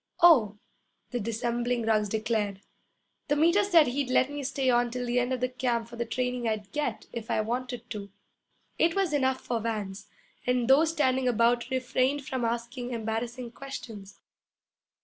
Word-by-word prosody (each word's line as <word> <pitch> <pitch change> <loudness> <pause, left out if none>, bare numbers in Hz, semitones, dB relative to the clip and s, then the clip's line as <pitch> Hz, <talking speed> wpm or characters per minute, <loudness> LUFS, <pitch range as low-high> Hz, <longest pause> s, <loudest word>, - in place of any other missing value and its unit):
'Oh,' 240 -12 +6 0.5
the 245 - -1
dissembling 235 +2 -1
Ruggs 215 -2 +2
declared, 215 -2 -1 0.7
'the 290 - +2
Meter 340 +7 +4
said 345 -6 +6
he'd 265 +1 -1
let 260 +2 +3
me 290 -1 -4
stay 270 0 -1
on 240 -1 +3
till 250 +1 -4
the 245 +1 +1
end 245 +1 -1
of 255 0 -2
camp 235 -3 0
for 235 - -10
the 235 0 -3
training 250 0 -1
I'd 210 -2 -3
get, 270 -5 -2
if 230 -2 -6
I - - +2
wanted 245 +1 -4
to.' 205 -2 -5 0.7
It 330 0 +3
was 385 -5 +1
enough 260 -2 +1
for 235 -2 -2
Vance, 210 -3 -4 0.4
and 250 -1 +2
those 295 +5 +5
standing 265 -5 +1
about 240 0 +2
refrained 260 +2 0
from 260 -2 -3
asking 240 +2 -3
embarrassing 230 +2 -3
questions. 230 -7 -9
245 Hz, 165 wpm, -28 LUFS, 230-260 Hz, 0.7 s, Oh